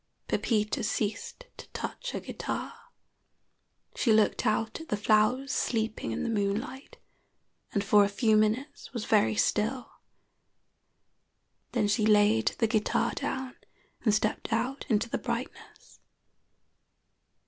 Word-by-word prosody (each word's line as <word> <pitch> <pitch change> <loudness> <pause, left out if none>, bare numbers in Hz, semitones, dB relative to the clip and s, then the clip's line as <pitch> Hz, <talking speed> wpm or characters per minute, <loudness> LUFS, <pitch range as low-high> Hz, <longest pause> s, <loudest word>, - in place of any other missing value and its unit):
Pepita 215 -2 0
ceased 465 - -3
to - - -10
touch - - -5
her - - -3
guitar. - - -5 1.2
She 235 - +1
looked 215 -1 +3
out 220 +6 0
at 320 - -12
the 210 - 0
flowers 215 +6 +2
sleeping 220 - -1
in 110 - -3
the - - -1
moonlight, 225 - -3 0.7
and 200 - 0
for 205 0 +5
a 200 - +1
few 215 +2 +2
minutes 225 +7 0
was 235 -3 -4
very 215 0 +3
still; 225 +5 0 1.8
then 220 -4 +2
she 210 +2 +1
laid 215 +1 +4
the 230 - +2
guitar 220 -1 +1
down 260 -1 -4 0.5
and 220 - +4
stepped 215 +2 -1
out 245 +5 -1
into 220 0 +2
the - - -3
brightness. 240 0 -6
220 Hz, 125 wpm, -29 LUFS, 210-250 Hz, 1.8 s, for